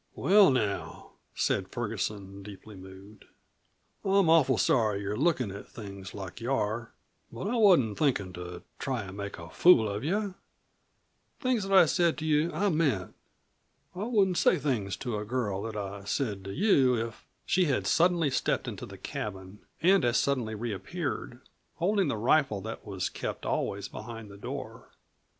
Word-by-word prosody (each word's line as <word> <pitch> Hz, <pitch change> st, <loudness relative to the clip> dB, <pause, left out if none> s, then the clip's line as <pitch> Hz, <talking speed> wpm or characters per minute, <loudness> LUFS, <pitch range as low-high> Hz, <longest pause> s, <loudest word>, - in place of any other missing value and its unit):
"Well, 200 Hz, -1 st, +6 dB
now," 110 Hz, -7 st, -2 dB, 0.2 s
said -, -, 0 dB
Ferguson, 100 Hz, -2 st, -4 dB
deeply 100 Hz, +1 st, -11 dB
moved; 95 Hz, +2 st, -13 dB, 0.8 s
"I'm 195 Hz, -4 st, +3 dB
awful 135 Hz, -7 st, +5 dB
sorry 110 Hz, -5 st, +2 dB
you're 100 Hz, +1 st, -3 dB
lookin' 130 Hz, -, +1 dB
at 100 Hz, +1 st, -9 dB
things 100 Hz, -3 st, -9 dB
like 95 Hz, 0 st, -7 dB
you 120 Hz, +3 st, -2 dB
are. 115 Hz, -2 st, -1 dB, 0.4 s
But -, -, -6 dB
I 235 Hz, -, -1 dB
wasn't 175 Hz, -, +4 dB
thinkin' 110 Hz, -11 st, +1 dB
to 90 Hz, 0 st, -8 dB, 0.2 s
try 130 Hz, -5 st, -2 dB
an' 95 Hz, 0 st, -9 dB
make 100 Hz, 0 st, -6 dB
a 85 Hz, 0 st, -10 dB
fool 170 Hz, -11 st, +6 dB
of 100 Hz, +1 st, -4 dB
you. 200 Hz, +5 st, -1 dB, 1.1 s
Things 250 Hz, -7 st, 0 dB
that 195 Hz, 0 st, +5 dB
I 175 Hz, -, +8 dB
said 170 Hz, +1 st, +2 dB
to 155 Hz, -, -4 dB
you 155 Hz, +2 st, +2 dB
I 205 Hz, 0 st, +1 dB
meant. 145 Hz, -, 0 dB, 0.8 s
I 190 Hz, +3 st, -4 dB
wouldn't 195 Hz, -7 st, +2 dB
say -, -, +4 dB
things 120 Hz, -10 st, -1 dB
to 120 Hz, -5 st, -3 dB
a -, -, -4 dB
girl 105 Hz, -4 st, -2 dB
that 110 Hz, 0 st, -5 dB
I 100 Hz, 0 st, -5 dB
said 105 Hz, -4 st, -2 dB
to 95 Hz, -, -5 dB
you 135 Hz, -, +3 dB
if 115 Hz, 0 st, -4 dB
" -, -, -45 dB
She 185 Hz, -1 st, +3 dB
had 140 Hz, -5 st, 0 dB
suddenly 170 Hz, -3 st, +3 dB
stepped -, -, 0 dB
into -, -, -6 dB
the -, -, -11 dB
cabin 95 Hz, -1 st, -6 dB, 0.2 s
and 190 Hz, -1 st, +5 dB
as 120 Hz, 0 st, +2 dB
suddenly 125 Hz, -6 st, 0 dB
reappeared 120 Hz, -, -4 dB, 0.3 s
holding 195 Hz, +2 st, +1 dB
the 120 Hz, -, -1 dB
rifle 120 Hz, -1 st, +2 dB
that 110 Hz, +3 st, -7 dB
was 95 Hz, -2 st, -2 dB
kept -, -, -5 dB
always 100 Hz, 0 st, -2 dB
behind 115 Hz, -3 st, -8 dB
the 100 Hz, -, -11 dB
door. 100 Hz, -, -7 dB
120 Hz, 170 wpm, -29 LUFS, 100-165 Hz, 1.1 s, I